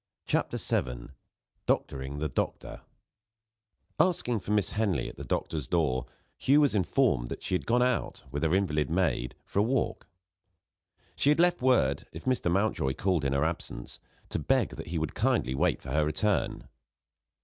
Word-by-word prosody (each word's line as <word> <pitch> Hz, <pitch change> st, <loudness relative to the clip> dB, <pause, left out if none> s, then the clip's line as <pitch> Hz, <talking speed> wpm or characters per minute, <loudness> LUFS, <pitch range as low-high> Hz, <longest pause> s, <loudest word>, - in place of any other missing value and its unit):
CHAPTER -, -, 0 dB
VII -, -, -1 dB, 0.6 s
DOCTORING 65 Hz, +2 st, -1 dB
THE 75 Hz, +1 st, -1 dB
DOCTOR 65 Hz, -, -3 dB, 1.2 s
ASKING 125 Hz, -10 st, +2 dB
for 100 Hz, -, -10 dB
Miss 105 Hz, -2 st, +1 dB
Henley 105 Hz, -8 st, 0 dB
at -, -, -8 dB
the -, -, -8 dB
doctor's 75 Hz, -6 st, -2 dB
door, 70 Hz, -8 st, +1 dB, 0.3 s
Hugh 145 Hz, +3 st, +5 dB
was 145 Hz, -, +3 dB
informed 95 Hz, -, +2 dB
that -, -, -6 dB
she -, -, -3 dB
had 90 Hz, -, -1 dB
gone 125 Hz, +1 st, +4 dB
out, 125 Hz, -1 st, -1 dB
with 70 Hz, +1 st, -3 dB
her 80 Hz, +2 st, +2 dB
invalid 75 Hz, -6 st, +1 dB
maid, 80 Hz, -8 st, 0 dB
for -, -, -1 dB
a -, -, +6 dB
walk. 120 Hz, +4 st, 0 dB, 1.1 s
She 140 Hz, -, +2 dB
had 150 Hz, -, +4 dB
left 175 Hz, -2 st, +3 dB
word, 125 Hz, -, +2 dB
if 80 Hz, -, -9 dB
Mr. 130 Hz, -8 st, +1 dB
Mountjoy 95 Hz, -9 st, +1 dB
called 90 Hz, -5 st, +1 dB
in 70 Hz, -1 st, +1 dB
her 70 Hz, +2 st, +2 dB
absence, 80 Hz, -7 st, -5 dB, 0.3 s
to -, -, -2 dB
beg -, -, +2 dB
that -, -, -8 dB
he 85 Hz, -, -3 dB
would 80 Hz, -1 st, -2 dB
kindly 65 Hz, +2 st, +1 dB
wait 65 Hz, -, +1 dB
for -, -, -6 dB
her 75 Hz, -, +2 dB
return. 85 Hz, +7 st, 0 dB
85 Hz, 170 wpm, -29 LUFS, 70-115 Hz, 1.2 s, a